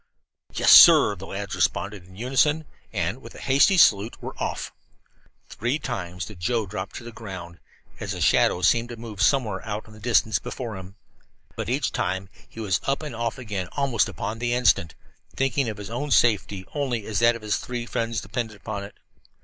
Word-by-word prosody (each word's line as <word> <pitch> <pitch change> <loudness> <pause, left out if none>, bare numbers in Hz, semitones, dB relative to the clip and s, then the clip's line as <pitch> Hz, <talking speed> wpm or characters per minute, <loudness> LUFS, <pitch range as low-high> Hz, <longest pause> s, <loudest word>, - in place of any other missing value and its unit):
"Yes, - - +4
sir," 105 - +9
the 95 +1 -10
lads 100 0 -5
responded 100 -3 -1
in 95 - -16
unison, 135 +7 +1 0.3
and, 95 +5 -2
with - - -12
a - - -10
hasty 140 +8 +4
salute, 110 - +4
were - - -7
off. - - -3 0.8
Three 120 +6 -2
times 90 - -5
did 105 -5 -11
Joe 115 +4 0
drop 95 0 -5
to - - -8
the 120 - -8
ground, 95 -6 -9 0.4
as - - -4
a - - -6
shadow 90 - +3
seemed 115 +5 +3
to 120 - -6
move 110 -3 -7
somewhere 105 -4 +2
out 105 -1 -4
in 110 - -15
the 110 - -13
distance 110 -3 +2
before 115 -5 -6
him. 95 +1 -10 0.6
But - - -4
each 135 +4 0
time 95 -3 -2 0.2
he - - -12
was 100 -5 0
up 135 +3 0
and 150 -6 -6
off 115 +2 -2
again 105 -7 -4
almost 135 -6 +1
upon 110 +2 -5
the 120 0 0
instant, 95 -9 +2 0.4
thinking 135 -1 0
of 110 - -6
his 105 +1 -8
own 145 +5 -3
safety 105 -6 +2
only 130 -7 -2
as 105 -3 -1
that 120 0 +4
of 115 - -9
his 105 -1 0
three 120 -1 -5
friends 115 -2 -2
depended 110 +1 -4
upon 100 0 -5
it. 100 - -10
110 Hz, 195 wpm, -24 LUFS, 100-120 Hz, 0.8 s, sir